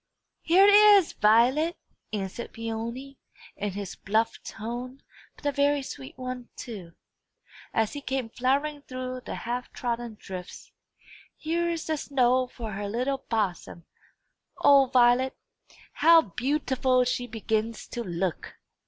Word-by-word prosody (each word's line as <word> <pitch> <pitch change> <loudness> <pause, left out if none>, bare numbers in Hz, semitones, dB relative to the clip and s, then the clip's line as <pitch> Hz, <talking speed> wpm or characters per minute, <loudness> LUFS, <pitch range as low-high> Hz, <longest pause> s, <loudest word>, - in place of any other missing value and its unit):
"Here 365 +4 +5
it 410 - +6
is, 410 -3 +7
Violet!" 250 +10 +3 0.3
answered 205 +2 -5
Peony, 230 +4 -5 0.4
in 205 -1 -3
his 200 -2 -6
bluff 220 +3 -1
tone 245 +4 -6 0.3
but - - -18
a 285 - +2
very 285 0 +2
sweet 135 - -9
tone, 255 -1 -6
too 190 -8 -8 0.8
as 220 -1 0
he 290 - -5
came 265 -3 -2
floundering 280 +5 0
through 255 -1 -6
the - - -5
half 245 +1 -4
trodden 235 -2 -4
drifts. 180 -2 -9 0.7
"Here 340 +2 -1
is 335 -1 -3
the 315 -1 -1
snow 255 -2 +2
for 230 -3 -7
her 200 0 -4
little 255 +5 -1
bosom. 185 -6 -2 0.7
O 280 -2 +6
Violet, 250 +1 +3 0.6
how 330 0 +6
beau 255 - -1
ti 270 -3 -4
ful 255 -1 +3
she 245 0 -2
begins 220 0 -2
to 240 - -4
look!" 175 -3 -3
250 Hz, 135 wpm, -27 LUFS, 220-275 Hz, 0.8 s, is